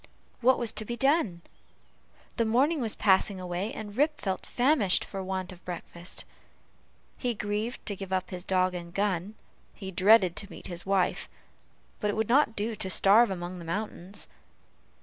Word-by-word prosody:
What 255 +2 +4
was 235 -2 -1
to 215 - -2
be 240 +2 -5
done? 270 - +1 0.9
The 230 - +3
morning 270 +7 +2
was 225 -3 -1
passing 195 -1 +3
away, 180 +4 -3
and 205 -2 -7
Rip 300 +4 +2
felt 190 -2 -3
famished 245 -7 +3
for 195 - -6
want 190 0 -3
of 180 - -12
his - - -32
breakfast. 175 0 -4 0.9
He 245 -2 -1
grieved 210 +4 -3
to 205 - -1
give 195 -1 -8
up 185 0 -1
his 180 -1 -5
dog 185 -1 +2
and 170 -1 -6
gun; 195 +1 -1 0.4
he 190 -2 -7
dreaded 190 0 +5
to 200 - -2
meet - - -11
his 175 +1 -5
wife; 195 -2 +1 0.7
but 210 - 0
it 205 - -1
would 220 0 -1
not 250 -3 +4
do 220 +2 -2
to 195 -3 -3
starve 205 +5 +5
among 180 -1 -5
the - - -8
mountains. 200 +1 -4
200 Hz, 175 wpm, -28 LUFS, 185-225 Hz, 0.9 s, dreaded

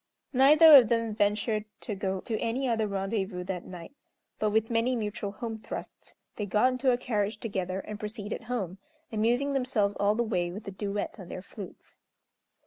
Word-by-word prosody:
Neither 300 +4 +8
of 240 -5 +5
them 230 -2 +1
ventured 210 +1 0 0.2
to 215 - -4
go 190 -1 -2
to 225 - -3
any 255 +4 -1
other 225 -3 +1
rendezvous 195 -1 -2
that 180 -1 -5
night; 180 +6 -9 0.5
but, 215 - +2
with 220 +2 +1
many 230 +2 +2
mutual 210 -2 -3
home 225 +1 -5
thrusts, - - -8 0.2
they 210 - -3
got 215 +6 +3
into 255 +1 +1
a 245 - +2
carriage 215 -4 -1
together, 190 -4 -3
and 210 +1 -8
proceeded 210 +1 -5
home, 200 -6 -3 0.3
amusing 240 +6 +1
themselves 250 -7 +1
all 205 +1 +3
the 240 - +1
way 180 -6 -1
with 200 +4 -8
a - - -3
duet 205 +3 -4
on 185 - -9
their 185 - -6
flutes. 200 -1 -11
215 Hz, 180 wpm, -29 LUFS, 200-235 Hz, 0.5 s, Neither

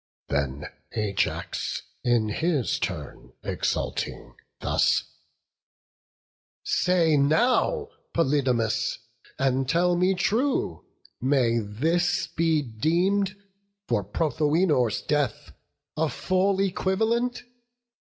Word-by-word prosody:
Then 70 0 -1 0.3
Ajax, 105 -3 -2 0.2
in 120 -3 +2
his 150 +2 0
turn, - - -5
exulting, - - -2 0.3
thus: - - +2 1.6
"Say 170 -4 +2
now, 250 - +2 0.2
Polydamas, 125 -7 +1 0.4
and 135 -1 +1
tell 175 +2 +3
me 185 +2 +2
true, 245 +9 0 0.4
May 125 -3 +2
this 165 - 0
be 165 -2 +1
deem'd 175 - +1 0.5
for 105 -4 +1
Prothoenor's 145 - +1
death 145 -6 -1 0.4
A 160 0 +1
full 190 +3 +1
equivalent? 220 +6 0
155 Hz, 80 wpm, -26 LUFS, 120-185 Hz, 1.6 s, tell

